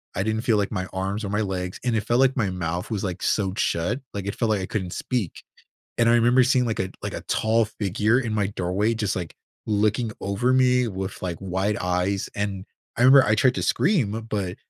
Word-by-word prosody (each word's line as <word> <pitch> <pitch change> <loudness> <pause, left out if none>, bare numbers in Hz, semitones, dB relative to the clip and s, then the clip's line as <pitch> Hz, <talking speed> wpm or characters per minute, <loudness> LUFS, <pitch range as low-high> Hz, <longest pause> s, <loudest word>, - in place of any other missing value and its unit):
I 95 - 0
didn't 110 +1 -1
feel 115 -3 +2
like 100 -1 0
my 95 -3 -2
arms 95 +3 -2
or - - -4
my 105 +2 0
legs, 90 -3 -3
and 120 -2 0
it 110 - 0
felt 120 +4 +1
like 135 0 +4
my 105 -5 +1
mouth 90 +2 -3
was, 105 -3 -2
like, 95 -2 -4
sewed 95 -2 0
shut, 90 +11 0
like, 100 -2 -4
it 100 - -3
felt 115 - 0
like 105 -3 +1
I - - -2
couldn't 95 -4 -3
speak. 120 -10 -3 0.6
And 115 -1 +3
I 120 - +5
remember 120 +2 +5
seeing, 130 0 +3
like 115 -2 -2
a 95 - 0
a - - -12
like, - - -4
a - - -4
tall 110 0 +1
figure 105 +2 0
in 120 -4 -2
my 105 -2 +1
doorway 100 +3 -1
just, 105 -3 -1
like, 85 -3 -5 0.3
looking 110 +2 +1
over 100 +6 0
me 125 -1 +3
with, 95 -1 -5
like, 85 -3 -3
wide 95 +2 -1
eyes, 90 +2 -1
and 100 -2 -3 0.3
I - - -4
remember 135 +1 +8
I 110 - +4
tried 125 +4 +3
to - - -1
scream, 115 - +1
but 95 -4 -2
105 Hz, 235 wpm, -24 LUFS, 95-115 Hz, 0.6 s, remember